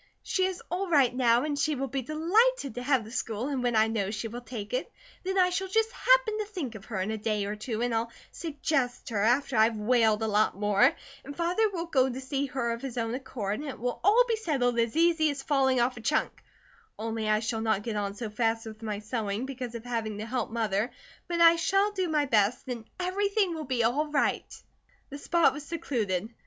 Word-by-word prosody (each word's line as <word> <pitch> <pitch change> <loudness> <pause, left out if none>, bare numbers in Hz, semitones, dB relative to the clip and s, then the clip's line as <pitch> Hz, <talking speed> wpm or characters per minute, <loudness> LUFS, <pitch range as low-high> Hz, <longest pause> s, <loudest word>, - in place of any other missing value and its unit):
She 375 - +1
is 375 -1 -3
all 365 +2 -2
right 275 -7 +4
now, 240 -1 +3
and 295 -2 -2
she 300 +1 +1
will 270 +1 -2
be 270 +1 -2
delighted 330 - +2
to 245 - -5
have 260 -2 +2
the 220 - -11
school, 230 +1 -3
and 270 -3 -1
when 245 -2 0
I 220 0 +5
know 215 -3 -1
she 215 +2 -3
will 240 +2 -7
take 230 -3 -7
it 255 - -2 0.3
then 380 +1 -2
I 365 -1 +4
shall 380 +2 -1
just 445 +4 +1
happen - - +3
to 425 - -1
think 355 - -5
of 215 -2 -10
her 205 -5 -4
in 195 +3 -2
a 220 - -3
day 210 -1 -1
or 205 +1 -3
two 220 +1 -3
and 245 -1 0
I'll 230 +1 -1 0.2
suggest 280 -5 -2
her, 210 -3 -1
after 245 +4 +2
I've 220 +1 +4
wailed 220 0 +2
a - - 0
lot 210 -2 +2
more; 205 -1 +4 0.3
and 285 +1 -9
Father 360 +6 +2
will 345 -4 -4
go 265 -6 +2
to 255 +1 -5
see 275 +1 -2
her 245 -3 -2
of 230 0 -4
his 265 -3 -6
own 230 -1 -1
accord, 220 -6 -4
and 295 0 -5
it - - -6
will 245 +1 -2
all 440 +6 +5
be 455 -2 +1
settled 255 - 0
as 230 +5 0
easy 330 -2 +4
as 280 -1 -4
falling 265 -3 +2
off 245 +1 +1
a - - -7
chunk, 300 +6 0 0.6
only 220 0 -3
I 215 0 +3
shall 225 0 -2
not 220 -2 0
get 225 -1 -3
on 200 -1 -2
so 220 0 -5
fast 225 +1 0
with 220 0 -9
my 215 -2 -3
sewing, 215 +1 -3
because 255 -3 -6
of 230 0 -7
having 225 -3 -3
to 215 - -5
help 245 0 -2
Mother; 220 -1 0 0.4
but 340 -1 -1
I 335 0 +8
shall 390 +5 +2
do 375 -3 -1
my 305 -2 +1
best, 220 -1 +1
and 240 -3 -5
everything 395 +1 +1
will 315 -2 -5
be 250 -3 0
all 275 +7 +1
right." 295 -1 -1 0.5
The 285 - -7
spot 340 +2 +3
was 295 - -7
secluded. 230 - -2
250 Hz, 235 wpm, -28 LUFS, 225-315 Hz, 0.6 s, I